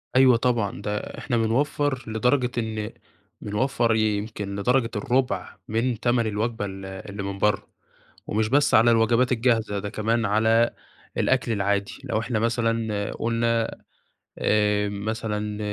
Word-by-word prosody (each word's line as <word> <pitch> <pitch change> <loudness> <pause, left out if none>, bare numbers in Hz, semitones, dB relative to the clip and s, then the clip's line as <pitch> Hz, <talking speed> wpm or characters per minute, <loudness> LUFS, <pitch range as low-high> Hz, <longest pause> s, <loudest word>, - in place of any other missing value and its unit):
أيوه 130 -2 +6
طبعًا، 115 -5 0
ده 105 0 -2 0.2
إحنا 120 -4 -1
بنوفر 130 +3 0
لدرجة 125 +3 +1
إن 110 -1 -2 0.5
بنوفر 115 +2 +1
يمكن 105 -2 -1
لدرجة 120 +4 +1
الرُبع 125 +5 -1
من 115 +1 0
تَمن 120 -1 +1
الوجبة 110 +1 -2
ال 95 -1 -7
اللي 95 +1 -7
من 100 0 -4
برّا. 105 0 +1 0.6
ومش 110 +1 0
بس 145 +3 +3
على 115 +2 +6
الوجبات 115 +2 +3
الجاهزة، 115 -4 +1
ده 100 - -4
كمان 110 +2 0
على 110 +3 +3 0.4
الأكل - - +1
العادي. 100 -1 0
لو - - -1
إحنا 115 -1 -1
مثلًا 115 -2 0
قلنا 115 0 0 0.7
آآ 105 -1 +2
مثلًا، 105 0 -3
110 Hz, 130 wpm, -25 LUFS, 105-120 Hz, 0.7 s, أيوه